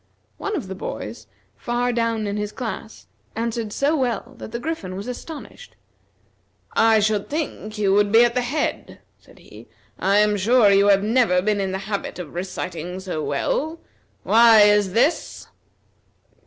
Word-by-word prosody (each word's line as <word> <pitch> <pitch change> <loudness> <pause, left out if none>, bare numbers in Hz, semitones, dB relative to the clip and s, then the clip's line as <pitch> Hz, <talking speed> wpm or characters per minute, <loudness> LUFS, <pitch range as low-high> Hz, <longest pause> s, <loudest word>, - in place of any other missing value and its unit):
One 415 - -3
of 280 - -4
the 190 - -5
boys, 110 - -7 0.3
far 240 - -1
down 230 -2 0
in 205 0 -3
his 210 0 -3
class, 225 -2 -7 0.3
answered 230 -1 -3
so 285 +8 +1
well 245 -7 -2
that - - -8
the 235 - -3
Griffin 240 - -5
was 200 +4 -6
astonished. 315 - -9 1.0
"I 225 -1 +4
should 210 -1 0
think 280 -8 -4
you 200 -2 +2
would 205 0 +3
be 230 +2 +7
at 240 - 0
the 250 - +1
head," 280 +5 -3 0.2
said - - -21
he. - - -15 0.3
"I 195 +2 +2
am 210 0 +3
sure 215 +1 +4
you 200 +1 +4
have 195 -1 +4
never 220 -5 +3
been 205 +2 0
in 190 -1 -2
the 190 - -2
habit 205 -1 -4
of 175 -5 -8
reciting 180 -1 -5
so 180 -5 -4
well. 310 - -2 0.4
Why 225 -1 +6
is 205 -2 +4
this?" 265 +9 0
215 Hz, 165 wpm, -22 LUFS, 195-240 Hz, 1.0 s, be